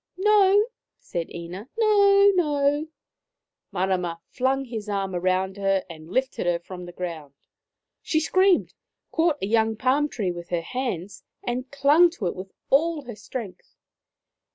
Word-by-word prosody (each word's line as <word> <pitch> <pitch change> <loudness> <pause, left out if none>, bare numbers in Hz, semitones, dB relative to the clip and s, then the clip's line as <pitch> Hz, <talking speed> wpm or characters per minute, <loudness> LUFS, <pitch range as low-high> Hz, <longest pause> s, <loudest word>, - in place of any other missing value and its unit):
" - - -54
No," 410 0 +5 0.3
said 170 -1 -5
Ina, 175 +7 -8
" - - -43
no, 405 -2 +5
no! 295 -3 +1 0.4
" - - -62
Marama 180 -2 -1
flung 265 +1 0
his 220 -4 -6
arm 195 -2 -2
round 185 +2 0
her 195 -1 +1
and 160 0 -12
lifted 260 -3 -1
her 175 -1 +2
from 180 +1 -9
the - - -8
ground. 165 -6 -6 0.7
She 315 - +1
screamed, 370 +3 +3 0.4
caught 325 -2 +2
a - - +2
young 220 +1 +2
palm 265 +6 +1
tree 200 -9 -2
with 175 0 -8
her 175 -2 -1
hands, 205 -5 -4 0.2
and 250 +2 -3
clung 285 +5 +5
to 205 - -4
it 175 - -1
with 190 +1 -8 0.2
all 310 +2 +2
her 240 -3 -8
strength. 210 -1 -8
230 Hz, 155 wpm, -25 LUFS, 185-300 Hz, 0.7 s, No